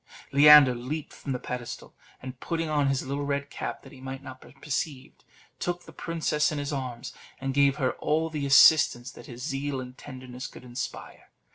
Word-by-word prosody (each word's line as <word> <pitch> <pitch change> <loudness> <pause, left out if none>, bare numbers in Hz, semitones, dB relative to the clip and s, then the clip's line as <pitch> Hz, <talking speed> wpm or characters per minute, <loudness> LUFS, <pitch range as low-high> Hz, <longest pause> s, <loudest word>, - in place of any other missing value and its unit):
Leander 145 -2 +8
leaped 130 +6 -5
from 140 - -7
the 130 - 0
pedestal, 125 -1 -7 0.3
and 130 -1 -8
putting 165 -1 -2
on 150 -2 +1
his 135 -1 0
little 140 +2 -3
red 140 0 -2
cap, - - -5
that - - -13
he 135 -3 -14
might 135 +1 -7
not 130 -1 -10
be - - -15
perceived, 145 -2 -4 0.4
took 175 0 -3
the - - -13
princess 160 -3 0
in 150 - -3
his 145 +1 -3
arms, 125 -3 -5 0.3
and 135 0 -3
gave 140 0 +4
her 130 -4 0
all 160 +2 +1
the 150 -3 -3
assistance 135 -3 +6
that - - -13
his 120 0 -9
zeal 140 -1 -2
and 125 0 -9
tenderness 130 -1 -8
could - - -13
inspire. 125 0 -7
140 Hz, 190 wpm, -27 LUFS, 130-150 Hz, 0.4 s, Leander